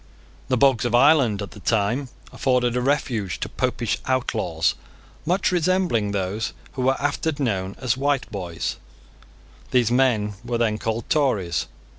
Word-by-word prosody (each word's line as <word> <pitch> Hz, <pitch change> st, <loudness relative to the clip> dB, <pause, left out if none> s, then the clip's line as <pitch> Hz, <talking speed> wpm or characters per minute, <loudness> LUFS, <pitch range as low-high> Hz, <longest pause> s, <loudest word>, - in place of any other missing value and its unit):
The 130 Hz, -, +1 dB
bogs 130 Hz, -3 st, +4 dB
of 120 Hz, -1 st, +1 dB
Ireland, 125 Hz, -6 st, +4 dB
at 100 Hz, -, -8 dB
the -, -, -11 dB
same -, -, -20 dB
time, 115 Hz, +5 st, +1 dB, 0.2 s
afforded 125 Hz, -2 st, +1 dB
a 125 Hz, -, +1 dB
refuge 120 Hz, -, -1 dB
to -, -, -1 dB
Popish 120 Hz, -4 st, -1 dB
outlaws, 130 Hz, -1 st, 0 dB, 0.5 s
much 185 Hz, +3 st, +2 dB
resembling 175 Hz, -, +1 dB
those 100 Hz, +3 st, -2 dB, 0.2 s
who 130 Hz, -, -4 dB
were 130 Hz, +1 st, +2 dB
afterwards 145 Hz, +1 st, -1 dB
known 100 Hz, -7 st, -1 dB
as 125 Hz, -4 st, 0 dB
Whiteboys. 120 Hz, -, -2 dB, 0.9 s
These 120 Hz, -3 st, +2 dB
men 120 Hz, -5 st, +2 dB
were 120 Hz, 0 st, -2 dB
then 110 Hz, -2 st, 0 dB
called 115 Hz, 0 st, -3 dB
Tories. 120 Hz, -, +1 dB
120 Hz, 145 wpm, -23 LUFS, 105-135 Hz, 0.9 s, bogs